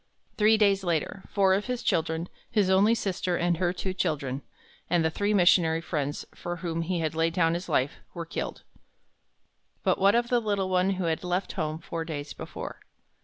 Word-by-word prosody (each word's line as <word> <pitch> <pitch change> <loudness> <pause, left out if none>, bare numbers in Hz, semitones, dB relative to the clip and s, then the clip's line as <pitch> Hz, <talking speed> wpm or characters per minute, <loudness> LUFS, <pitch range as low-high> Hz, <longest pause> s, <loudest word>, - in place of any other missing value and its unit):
Three 220 +1 +5
days 200 -2 +3
later, 175 +2 -1
four 195 -2 +3
of 200 +2 0
his 250 -1 -3
children, 160 +1 0 0.2
his 200 -3 +2
only 205 +4 +5
sister 185 -4 -1
and 175 -1 +1
her 175 0 +1
two 185 +1 -3
children, 140 -6 -1 0.5
and 170 -1 +2
the 160 - +2
three 205 +5 0
missionary 175 -4 +4
friends 150 -3 -3
for 175 0 -5
whom 165 -1 -3
he 170 0 -1
had 155 -1 -1
laid 165 +1 0
down 165 -2 +3
his 175 +3 -4
life, 130 +2 +1 0.2
were 170 -1 -4
killed. 165 - -5 1.2
But - - +2
what 200 +3 +5
of 235 0 +1
the 245 - +3
little 200 -4 -1
one 185 +1 +2
who 185 - -2
had 165 0 -1
left 180 +2 -1
home 155 -4 -2
four 165 0 -5
days 150 -3 -5
before? - - -7
175 Hz, 190 wpm, -27 LUFS, 165-195 Hz, 1.2 s, Three